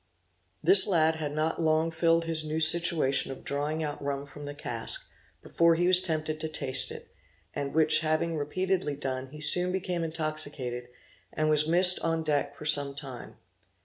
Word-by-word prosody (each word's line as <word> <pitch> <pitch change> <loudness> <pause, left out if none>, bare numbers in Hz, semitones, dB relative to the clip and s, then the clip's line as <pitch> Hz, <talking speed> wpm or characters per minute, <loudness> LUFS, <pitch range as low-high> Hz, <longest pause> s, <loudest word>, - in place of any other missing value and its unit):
This 385 - +7
lad 160 -4 +1
had 150 -2 -5
not 155 +2 -3
long 160 +1 0
filled 165 0 0
his 165 -1 0
new 155 +1 -4
situation 160 -4 +3
of 135 - -11
drawing 150 +3 -4
out 145 -1 -6
rum 140 0 -5
from 145 +1 -12
the 145 0 -8
cask, 115 -5 -5 0.4
before 170 0 +1
he 175 +2 -1
was 185 0 +4
tempted 155 -3 -4
to 160 - -5
taste 135 -4 0
it, - - -12 0.4
and 140 -1 -5
which 160 -1 +3
having 160 +1 -2
repeatedly 180 +1 -3
done 130 -2 -5
he 150 +3 -13
soon 180 +4 +5
became 180 -2 -4
intoxicated, 155 -6 -5 0.4
and 155 0 -2
was 150 0 +2
missed 180 +2 +6
on 165 -1 -3
deck 145 -2 -2
for 150 - -12
some 145 -2 +3
time. 135 -4 -9
155 Hz, 175 wpm, -27 LUFS, 145-165 Hz, 0.4 s, This